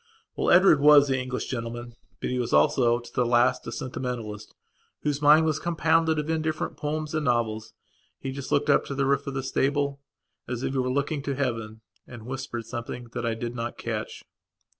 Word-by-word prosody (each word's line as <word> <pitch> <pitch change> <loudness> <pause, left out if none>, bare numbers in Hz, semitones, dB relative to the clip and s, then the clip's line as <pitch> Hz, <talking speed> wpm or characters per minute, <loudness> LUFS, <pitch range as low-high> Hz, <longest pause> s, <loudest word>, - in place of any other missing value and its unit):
Well, - - 0
Edward 175 -4 +6
was 145 0 +7
the 130 -1 +1
English 130 0 -3
gentleman; 120 0 -5 0.3
but - - -3
he 125 - -1
was 120 -1 -2
also, 125 -6 +4
to 120 0 -11
the 125 - +2
last, 120 +1 +2
a - - -4
sentimentalist, 120 -5 -5 0.5
whose 145 -1 -1
mind 150 +2 +6
was 155 -1 0
compounded 165 -1 +2
of 150 0 -2
indifferent 160 -1 -2
poems 155 +1 -3
and 155 -1 0
novels. 110 -3 -1 0.4
He 135 - -5
just 135 0 -7
looked 145 +1 +3
up - - +4
to 140 - -5
the 135 0 +1
roof 140 +1 +1
of 140 - -4
the 135 - -2
stable, 140 +1 0 0.5
as 120 0 -4
if - - -1
he 135 - 0
were 130 0 0
looking 140 +3 -1
to 140 0 -3
Heaven, 115 -5 -3 0.3
and 120 -3 -10
whispered 125 -3 -5
something 120 +1 -6
that - - -2
I 115 - 0
did 120 +1 -4
not 120 0 -4
catch. 110 -2 -5
130 Hz, 200 wpm, -26 LUFS, 120-145 Hz, 0.5 s, was